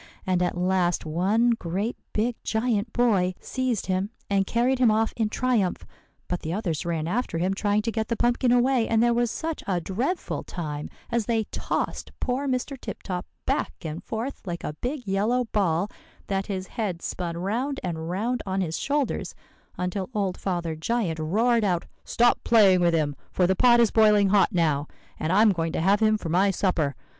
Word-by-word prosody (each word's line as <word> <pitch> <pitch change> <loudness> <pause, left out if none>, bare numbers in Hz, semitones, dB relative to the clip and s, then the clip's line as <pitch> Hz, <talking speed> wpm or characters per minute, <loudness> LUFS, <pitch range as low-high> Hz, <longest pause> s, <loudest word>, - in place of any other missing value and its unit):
And 185 -1 +1
at 175 0 0
last 180 -1 +1
one 195 +9 +2
great 205 +2 -2 0.2
big 230 +3 0
giant 220 -1 0
boy 195 -7 +2
seized 255 -5 -2
him, 190 +2 -1 0.2
and 195 -1 +2
carried 250 +2 +1
him 250 -3 +5
off 220 +1 +2
in 220 -2 0
triumph; 225 -7 0 0.4
but 180 - -2
the 160 - -5
others 175 -6 -2
ran 165 -2 -1
after 210 -2 -1
him, 185 +3 +1
trying 205 +1 +1
to 230 - -1
get 220 -1 -2
the 235 - -1
pumpkin 240 +1 +2
away; 245 -1 +3
and 225 0 +3
there 240 0 +4
was 240 0 +1
such 320 +5 -4
a 185 -3 +1
dreadful 240 - -2
time 150 -4 -5 0.2
as 235 -3 0
they 225 -2 +1
tossed - - -3
poor 265 +3 -1
Mr. 260 +2 -1
Tip - - -7
Top 180 -2 -4 0.2
back 75 - 0
and 160 +2 -5
forth 230 +5 -4
like 170 -1 -4
a 150 - -3
big 250 - -4
yellow 215 +6 +1
ball, 185 -3 +1 0.4
that 195 0 -2
his 190 -3 -3
head 195 -6 -4
spun 170 -2 -3
round 240 +10 -2
and 165 -2 -3
round 225 +7 -1
on 190 0 -2
his 165 -4 -2
shoulders, 285 -2 -1 0.4
until 180 +1 -2
old 195 -3 0
Father 175 -4 -2
Giant 170 -1 -1
roared 225 +9 +2
out, 180 -4 +1 0.2
'Stop 240 0 +2
playing 200 -6 +5
with 170 -1 +3
him; 150 -3 0 0.2
for 180 - +2
the 190 +2 +2
pot 240 +3 +5
is 230 -3 +4
boiling 210 -3 +5
hot 200 0 +4
now, 155 -4 +1 0.3
and 155 - -1
I'm 210 +3 +5
going 165 -3 -2
to - - -1
have 195 +4 +3
him 215 -1 +3
for 175 - -6
my 185 +5 +3
supper. 175 -8 0
200 Hz, 190 wpm, -26 LUFS, 175-235 Hz, 0.4 s, him